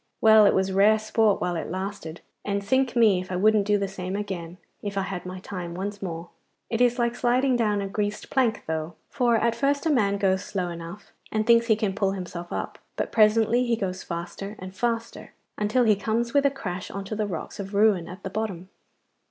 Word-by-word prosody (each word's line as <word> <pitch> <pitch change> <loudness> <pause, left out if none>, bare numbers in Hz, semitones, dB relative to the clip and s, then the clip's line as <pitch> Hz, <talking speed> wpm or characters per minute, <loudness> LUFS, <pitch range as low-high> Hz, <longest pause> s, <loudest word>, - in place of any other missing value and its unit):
Well, 220 -1 +7
it - - +3
was 190 0 +1
rare 205 +3 +5
sport 215 -1 +2
while 175 -1 -1
it 165 - -4
lasted, 185 -3 -5 0.2
and 200 0 -2
sink 260 +4 +1
me 215 -6 +4
if 185 - -9
I - - -1
wouldn't 210 +2 +3
do 210 0 +4
the 200 -1 -1
same 190 0 -5
again 185 -4 -5 0.2
if 200 -1 -5
I 195 - +1
had 185 -2 -5
my 185 0 -6
time 180 -3 -6
once 200 +2 -5
more. 170 -2 -5 0.4
It 230 +1 0
is 245 -1 +4
like 235 -1 +1
sliding 250 +2 +2
down 210 -4 +1
a - - -3
greased 205 +1 -3
plank 245 -5 +1
though, 160 +1 -3 0.2
for 240 -2 +2
at 230 +1 +2
first 280 +4 0
a 320 - +3
man 200 -7 +2
goes 190 -1 +1
slow 185 -3 -3
enough, 170 +4 -9 0.2
and 215 0 0
thinks 230 0 +5
he 220 - +5
can 210 -2 -1
pull 195 -1 0
himself 175 -2 -6
up, - - -4 0.2
but - - -3
presently 225 +2 +4
he 235 -2 +1
goes 190 -4 -3
faster 175 +4 -6
and 185 +1 -9
faster, 230 +1 -3 0.2
until 215 +4 +1
he 215 -3 +4
comes 225 +3 -1
with 280 0 +4
a - - +3
crash 190 -10 -5
on 200 - -5
to 215 - -4
the 210 -1 -1
rocks 175 0 -6
of 200 0 -6
ruin 200 -4 +3
at 185 +3 -10
the 190 - -5
bottom. 190 -4 -4
205 Hz, 220 wpm, -25 LUFS, 185-225 Hz, 0.4 s, Well